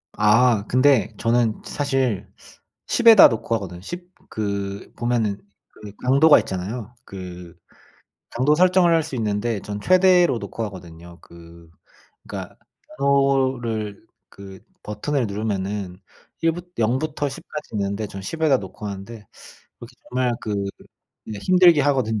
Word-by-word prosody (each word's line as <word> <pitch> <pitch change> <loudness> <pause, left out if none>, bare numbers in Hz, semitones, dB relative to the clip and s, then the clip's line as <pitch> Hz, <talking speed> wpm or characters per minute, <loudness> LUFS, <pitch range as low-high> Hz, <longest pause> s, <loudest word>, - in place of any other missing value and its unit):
아 105 +1 +4
근데 130 -4 +3
저는 115 -1 0
사실 135 -7 -1 0.6
10 240 - 0
에다 225 -3 +10
놓고 115 -1 -2
하거든, 90 -5 -6
10 175 - -8 0.2
그 100 -2 -4
보면은 115 -4 0 0.3
그 105 -2 -12
강도가 140 +4 +6
있잖아요. 105 +5 -4
그 90 -2 -10 0.8
강도 130 +5 +2
설정을 180 0 +4
할 165 - +3
수 150 -4 -6
있는데 110 0 -1
전 105 +1 -6
최대로 180 - +4
놓고 115 - -6
하거든요. 85 -3 -12
그 85 0 -16 0.6
그러니까 - - -7 0.4
번호를 130 -7 0 0.2
그 95 -1 -12 0.2
버튼을 120 +5 -2
누르면은 100 -2 -3 0.5
1 165 0 +3
부 175 +2 -7 0.2
0 115 +3 +1
부터 150 -2 -2
10 135 - -8
까지 150 0 -7
있는데 100 +1 -2
전 95 0 -9
10 160 +11 -6
에다 145 -5 +4
놓고 100 +2 -9
하는데 100 +2 -8 0.5
그렇게 - - -12
정말 125 0 0
그 105 - -3 0.7
이게 105 - -6
힘들게 180 -4 +5
하거든요. 130 -7 +1
115 Hz, 255 characters per minute, -22 LUFS, 100-140 Hz, 0.8 s, 에다